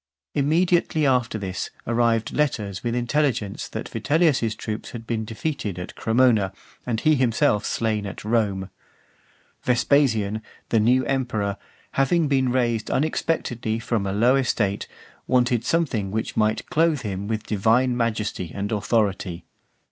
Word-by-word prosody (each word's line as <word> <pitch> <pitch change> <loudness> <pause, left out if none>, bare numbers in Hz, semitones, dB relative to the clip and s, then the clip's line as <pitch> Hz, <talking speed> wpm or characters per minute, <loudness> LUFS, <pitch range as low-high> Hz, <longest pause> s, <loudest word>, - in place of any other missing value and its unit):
Immediately 160 +2 +2
after 125 -4 +2
this, 95 -2 -4 0.2
arrived 115 -1 +1
letters 105 -10 -1
with 120 0 -1
intelligence 120 -4 0
that - - -5
Vitellius's 145 -8 +1
troops 110 -1 -5
had 115 -1 -7
been 110 -1 -2
defeated 110 - -3
at 90 - -6
Cremona, 110 -5 +2 0.3
and 115 -3 0
he 155 - +4
himself 115 -6 +2
slain 110 -3 -1
at 100 - -8
Rome. 100 -4 0 0.9
Vespasian, 115 -5 +2 0.3
the 115 - +3
new 125 +4 +3
emperor, 115 -7 -1 0.4
having 155 +4 +2
been 130 -3 +2
raised 120 -3 0
unexpectedly 130 -7 -1
from 115 -3 -1
a - - -1
low 120 +6 +4
estate, 110 -7 0 0.4
wanted 125 -2 +2
something 130 -13 0
which 110 +3 -3
might 110 0 +1
clothe 160 -3 +2
him 100 -3 -4
with 110 0 -2
divine 115 +5 +2
majesty 110 -7 -2
and 100 +1 -3
authority. 100 -4 0
115 Hz, 135 wpm, -24 LUFS, 105-130 Hz, 0.9 s, he